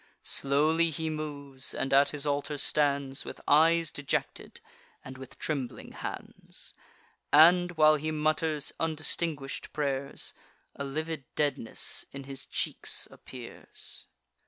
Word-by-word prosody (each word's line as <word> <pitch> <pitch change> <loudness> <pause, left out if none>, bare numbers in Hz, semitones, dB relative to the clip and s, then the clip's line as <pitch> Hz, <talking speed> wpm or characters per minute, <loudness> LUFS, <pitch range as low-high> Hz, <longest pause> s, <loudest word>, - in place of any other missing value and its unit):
Slowly 155 +4 +3
he 160 +1 -2
moves, 140 -3 -4
and 135 - -1
at 140 +1 +6
his 145 -1 -2
altar 145 0 -1
stands 140 -1 +1
With - - -8
eyes 165 +2 +5
dejected, 145 -1 -3 0.5
and 130 - -8
with 130 - -10
trembling 140 -6 -3
hands; - - -4 0.6
And, 175 +4 +7
while 155 -1 +6
he 155 +2 -3
mutters 155 -1 0
undistinguish'd 155 -2 -2
pray'rs, 140 -2 -2 0.4
A 140 - -4
livid 155 +1 -3
deadness 145 -6 -1
in 140 0 -6
his 135 0 -7
cheeks - - 0
appears. 125 -2 -6
145 Hz, 115 wpm, -30 LUFS, 140-155 Hz, 0.6 s, And